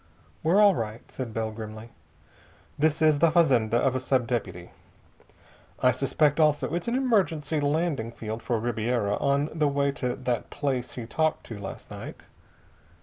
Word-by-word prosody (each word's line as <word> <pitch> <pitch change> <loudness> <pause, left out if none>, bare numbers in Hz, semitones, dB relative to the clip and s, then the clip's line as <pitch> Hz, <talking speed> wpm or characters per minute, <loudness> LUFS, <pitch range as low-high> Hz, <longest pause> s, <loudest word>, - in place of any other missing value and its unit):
"We're 170 +6 +3
all 205 -2 +7
right," 110 -5 -4
said 125 -4 -5
Bell 110 0 -2
grimly. 110 +1 -8 0.8
"This 155 +1 +1
is 155 -2 +4
the 165 +1 +5
fazenda 130 -9 +3
of 130 +1 +2
a - - +1
sub 130 -1 +1
deputy. 105 -7 -4 1.1
I 125 - +4
suspect, 145 +4 +1
also, 150 0 +2
it's 175 +4 -2
an 235 - 0
emergency 180 - +1
landing 145 -5 0
field 110 0 -6
for 120 -2 -1
Ribiera 115 -2 0
on 140 +1 +1
the 155 -2 +1
way 140 0 +1
to 125 -2 0
that 125 -3 -2
place 130 -3 -2
he 120 - -6
talked 155 +6 0
to 110 - -7
last 100 -1 -8
night. - - -8
135 Hz, 160 wpm, -27 LUFS, 115-155 Hz, 1.1 s, all